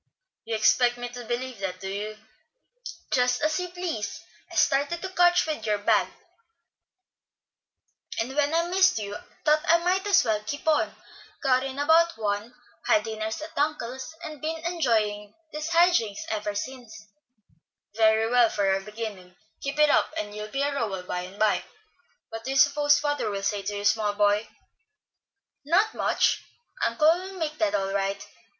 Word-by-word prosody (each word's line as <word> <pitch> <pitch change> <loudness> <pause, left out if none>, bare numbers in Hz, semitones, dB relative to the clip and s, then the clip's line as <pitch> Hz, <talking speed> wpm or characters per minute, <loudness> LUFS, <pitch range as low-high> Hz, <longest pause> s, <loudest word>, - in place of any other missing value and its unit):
"You 225 - -2
expect 240 +3 +3
me 245 0 -5
to 245 0 -9
believe 245 0 -4
that, 185 -2 -4
do 190 - -6
you?" 210 +2 -4 0.9
"Just 250 0 +2
as 310 +2 +1
you 360 - -3
please. 340 - -4 0.3
I - - -9
started 285 +5 +2
to 380 - -3
catch 355 -1 +4
you 315 - -1
with 225 - -9
your 210 -1 +2
bag, 205 - +2 2.1
and 250 +4 -2
when 290 0 +2
I 330 +1 +2
missed 370 -2 +3
you, 205 -1 -4 0.3
thought 305 0 +4
I 335 - +6
might 365 +3 0
as 400 -9 +4
well 215 -2 0
keep 285 +9 -6
on. 310 -1 +2 0.5
Got 260 -1 +3
in 270 0 -5
about 325 +3 +4
one, 210 +2 -3 0.3
had 210 - +4
dinner 220 -1 -4
at 220 - -4 0.2
uncle's, 285 -1 -2
and 310 -3 -8
been 320 +1 -2
enjoying 215 - 0 0.2
these 305 +2 -4
high 345 +2 +5
jinks 220 - -1
ever 210 -1 -2
since." 230 -2 -7 0.9
"Very 220 0 +3
well, 240 -1 +4
for 195 -2 +1
a 195 - -1
beginning. 205 -3 -7 0.3
Keep 275 +1 -4
it 300 -1 +5
up - - +2
and 210 -8 -4
you'll 210 0 -5
be 275 +6 -2
a 285 0 0
Rowell 205 -9 -2
by 180 0 -3
and 185 +2 -8
by. 215 -1 +2 0.7
What 225 0 -7
do 260 - -5
you 270 - 0
suppose 290 0 +5
father 290 -5 -1
will 200 -1 -4
say 205 0 0
to 205 +1 -4
you, 205 - -5
small 210 -1 +2
boy?" 205 +1 +2 1.1
"Not 365 +9 +2
much. - - +1 0.4
Uncle 310 0 +4
will 380 +1 -8
make 315 -4 -4
that 320 -6 +1
all 195 -1 -1
right. 195 0 -2
245 Hz, 175 wpm, -26 LUFS, 210-305 Hz, 2.1 s, I